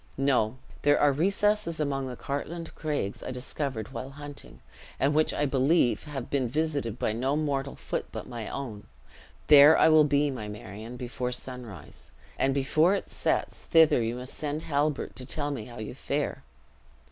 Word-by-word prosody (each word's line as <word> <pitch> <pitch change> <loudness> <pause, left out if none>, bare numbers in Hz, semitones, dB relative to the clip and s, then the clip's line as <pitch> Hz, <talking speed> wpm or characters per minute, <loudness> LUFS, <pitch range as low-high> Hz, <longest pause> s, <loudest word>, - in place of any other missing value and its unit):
No! 130 -4 +2 0.2
there 145 0 +4
are 145 - +5
recesses 195 +2 +1
among 135 -3 -1
the 125 - -6
Cartlane 155 +6 -4
Craigs, 145 -10 -3
I - - -6
discovered 130 -1 -4
while 130 - -5
hunting, 145 +1 -10 0.4
and 140 +2 +2
which 155 +1 +3
I 145 - 0
believe 135 0 +2
have 140 -5 -5
been 135 -3 +1
visited 140 -4 -1
by 110 - 0
no 130 +5 0
mortal 140 -3 -1
foot - - -4
but - - -6
my 115 -3 -6
own. 115 -7 -6 0.6
There 150 +1 +8
I - - +6
will 155 -1 +7
be, 145 0 +2
my 110 -5 -5
Marion, 105 +3 -8
before 125 0 -3
sunrise; 125 - -6 0.3
and 135 - +3
before 155 +7 +3
it - - -5
sets, - - -1
thither 160 -6 +5
you 115 +1 -1
must 125 +1 -6
send 150 +1 -3
Halbert, 145 -1 -1
to 125 - +1
tell 145 0 -1
me 120 -7 -4
how 120 -1 -11
you 110 +2 -6
fare. 140 +2 -2
140 Hz, 170 wpm, -28 LUFS, 125-150 Hz, 0.6 s, There